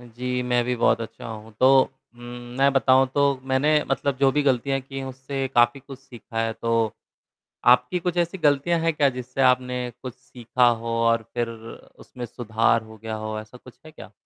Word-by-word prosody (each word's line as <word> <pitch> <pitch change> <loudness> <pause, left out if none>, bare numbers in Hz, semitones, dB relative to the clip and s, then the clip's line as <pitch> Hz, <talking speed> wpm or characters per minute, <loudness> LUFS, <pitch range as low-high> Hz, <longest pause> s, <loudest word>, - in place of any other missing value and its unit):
जी, 125 +1 -4
मैं 125 -1 +1
भी 125 +1 -1
बहुत 115 -1 +2
अच्छा 115 - -8
हूँ। 110 0 -9
तो 130 - +6 0.5
उम, 120 - -16 0.4
मैं 140 +1 +4
बताऊँ 135 0 +4
तो 140 -1 +2
मैंने 150 +3 +3
मतलब 135 0 0
जो 135 -1 +4
भी 150 - +1
गलतियाँ 135 0 +1
की 135 +1 -8
हैं, 135 - -5
उससे 135 +1 -4
काफ़ी 120 +3 +3
कुछ 135 0 -11
सीखा 120 -4 -7
है। 115 - -2
तो, 115 -1 0 0.7
आपकी 125 +7 +4
कुछ 175 0 -3
ऐसी 175 +2 0
गलतियाँ 155 +1 +2
हैं 165 0 +1
क्या 145 -2 +3
जिससे 125 +1 -5
आपने 125 -1 +1
कुछ 130 -2 -7
सीखा 125 -1 0
हो 115 -1 -3 0.2
और 115 0 +2
फिर 120 -1 -1
उसमें 115 +2 -11
सुधार 115 -1 0
हो 110 0 -14
गया 110 +1 -6
हो, 110 0 -4
ऐसा 110 +3 -12
कुछ 125 0 -17
है 155 - -11
क्या? 155 - -13
125 Hz, 195 wpm, -24 LUFS, 115-135 Hz, 0.7 s, तो